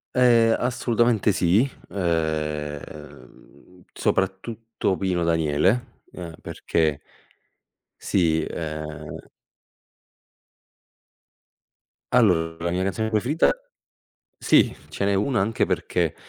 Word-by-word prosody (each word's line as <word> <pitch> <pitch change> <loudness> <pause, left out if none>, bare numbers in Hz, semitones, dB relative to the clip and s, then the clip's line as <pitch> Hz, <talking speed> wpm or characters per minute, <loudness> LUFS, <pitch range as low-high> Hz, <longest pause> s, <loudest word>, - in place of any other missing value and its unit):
Ehm, 120 -3 +5
assolutamente 120 -3 +1
sì, 95 +7 +3 0.2
ehm, 75 -5 -3 0.2
uhm, 90 +6 -21
soprattutto 100 +2 -1
Pino 90 -2 -1
Daniele, 85 - +1
ehm, 85 -3 -8
perché 80 -3 -1 1.0
Sì, 80 -4 +1
ehm 75 -2 -6 2.9
Allora 85 -9 +3
la - - +1
mia 90 +2 -1
canzone 110 +3 -1
preferita 120 +9 +2 0.9
sì - - +4 0.2
ce - - -4
n'è 100 0 +2
una 105 +2 +1
anche 110 +3 +1
perché - - -1
95 Hz, 85 wpm, -24 LUFS, 80-115 Hz, 2.9 s, Ehm